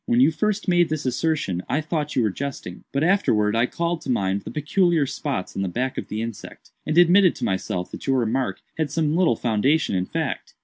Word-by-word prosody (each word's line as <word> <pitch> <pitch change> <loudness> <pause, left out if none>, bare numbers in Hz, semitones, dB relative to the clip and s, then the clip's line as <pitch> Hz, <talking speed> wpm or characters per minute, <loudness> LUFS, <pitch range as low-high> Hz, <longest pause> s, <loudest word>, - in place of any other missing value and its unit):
When 120 - +3
you 135 +5 +5
first 210 +6 -1
made 175 -2 +3
this 155 -2 -3
assertion 130 - -1
I 150 - +1
thought 155 -1 -3
you 125 - +3
were 105 - +1
jesting; 130 -7 -6
but 140 +2 0
afterwards 115 - +2
I 115 +2 +3
called 170 +2 -2
to - - -8
mind 100 -4 0
the - - -8
peculiar 160 +1 +1
spots 135 -7 -4
on 95 - -2
the 95 - -1
back 125 +8 -2
of - - -5
the 110 +1 -3
insect, 115 -2 -9 0.2
and 155 - 0
admitted 175 +1 +6
to - - -7
myself 95 -1 -2
that - - -8
your 135 -1 +3
remark 125 +2 -1 0.2
had 155 -2 0
some 155 +1 0
little 170 -9 +3
foundation 120 +6 +1
in 90 0 -1
fact. - - -4
140 Hz, 220 wpm, -23 LUFS, 110-160 Hz, 0.2 s, admitted